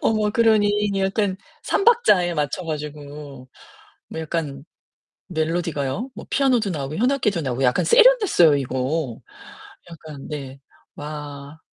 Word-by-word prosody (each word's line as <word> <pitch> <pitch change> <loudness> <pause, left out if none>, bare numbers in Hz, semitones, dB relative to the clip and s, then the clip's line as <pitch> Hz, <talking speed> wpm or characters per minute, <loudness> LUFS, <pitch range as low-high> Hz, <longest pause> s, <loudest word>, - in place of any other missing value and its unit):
어머 215 -1 +1
그러니 210 -2 +2
약간 195 0 0 0.3
3 - - 0
박자에 205 - +4
맞춰 150 +4 -2
가지고 145 -3 -7 0.6
뭐 160 - -6
약간 150 -4 -4 0.6
멜로디가요. 165 - -2
뭐 - - -9
피아노도 255 -6 +2
나오고 145 -2 -4
현악기도 240 -6 +1
나오고 130 -2 -2
약간 125 -1 +2
세련됐어요 465 - +5
이거. 130 0 -2 0.7
약간 155 -4 -10
네. 140 -3 -7 0.4
와. 145 0 -8
160 Hz, 260 characters per minute, -22 LUFS, 145-210 Hz, 0.7 s, 세련됐어요